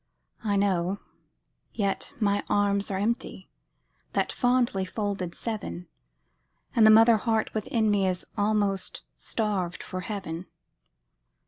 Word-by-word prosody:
I 205 -2 +1
know, 195 -1 +1 0.7
yet 200 -3 -1
my 205 -2 +1
arms 200 -1 +2
are 195 - -1
empty, 205 -2 -2 0.6
That - - +1
fondly 245 -6 +2
folded 195 -2 -3
seven, 210 -6 -5 0.9
And 220 -2 +7
the - - +8
mother 225 +1 +7
heart 220 0 0
within 220 0 +1
me 195 -2 +2
Is 185 -1 -2
almost 205 -2 +1
starved 200 -6 -1
for 185 - -5
heaven. 185 -4 -5
205 Hz, 115 wpm, -27 LUFS, 190-220 Hz, 0.9 s, the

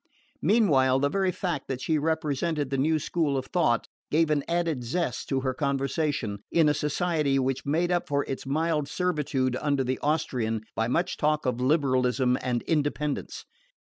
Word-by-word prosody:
Meanwhile 140 - +4
the 140 +1 +1
very 190 +3 +1
fact 175 -5 -3
that 130 -2 -3
she 155 +4 0
represented 150 -1 -1
the 135 - 0
new 155 +3 +2
school 155 -2 0
of 130 - -3
thought 155 -10 +1 0.2
gave 160 0 +2
an 145 -2 +1
added 170 -6 0
zest 170 +9 -2
to 135 -1 0
her 130 -1 -1
conversation 140 -5 -1
in 165 -2 +4
a 150 - +4
society 150 -1 0
which 135 0 -1
made 170 +5 +1
up 175 -1 0
for 140 -1 +1
its 135 - -5
mild 150 +1 0
servitude 145 -6 -1
under 140 -2 +1
the 130 +1 -2
Austrian 120 -8 -1
by 115 - 0
much 175 +9 0
talk 150 0 +1
of 125 -1 -1
liberalism 130 -3 +2
and 120 -2 -1
independence. 150 -2 -2
145 Hz, 170 wpm, -27 LUFS, 130-160 Hz, 0.2 s, Meanwhile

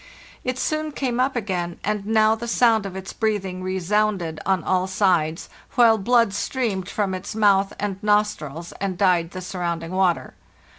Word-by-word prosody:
It 255 0 -2
soon 310 +2 -2
came 250 -4 -2
up 260 +1 +1
again, 180 -6 -3
and 210 -1 -2
now 220 0 +4
the 230 +1 -5
sound 225 -3 +3
of 190 - -9
its 190 0 -7
breathing 195 -4 -2
resounded 185 -2 0
on 190 -4 +2
all 185 +2 +1
sides, 180 -5 +1 0.3
while 230 -2 +5
blood 230 0 +3
streamed 200 -4 -2
from 200 -3 -1
its 185 +3 -5
mouth 200 -2 +3
and 195 -1 -3
nostrils, 205 -7 0
and 190 -2 -2
dyed 180 -3 +2
the 185 +1 -7
surrounding 170 -2 -4
water. 185 -2 +1
195 Hz, 160 wpm, -23 LUFS, 185-220 Hz, 0.3 s, while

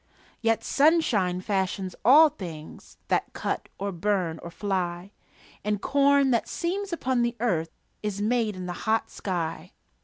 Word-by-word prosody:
Yet 225 -1 +1
sunshine 245 - +2
fashions 190 -1 -1
all 300 +7 +8
things 170 - -10
That - - 0
cut - - -3
or 200 +1 -3
burn 180 -3 -1
or 170 - -7
fly; 180 -1 -3 0.5
And 210 0 0
corn 280 +3 +3
that 235 - +1
seems 385 +3 -2
upon 260 -7 0
the 235 0 0
earth 175 -9 0 0.3
Is 210 -1 -3
made 220 -1 +1
in 185 -1 -6
the 180 - -4 0.2
hot 225 0 +1
sky. 170 -2 -4
205 Hz, 145 wpm, -26 LUFS, 180-250 Hz, 0.5 s, all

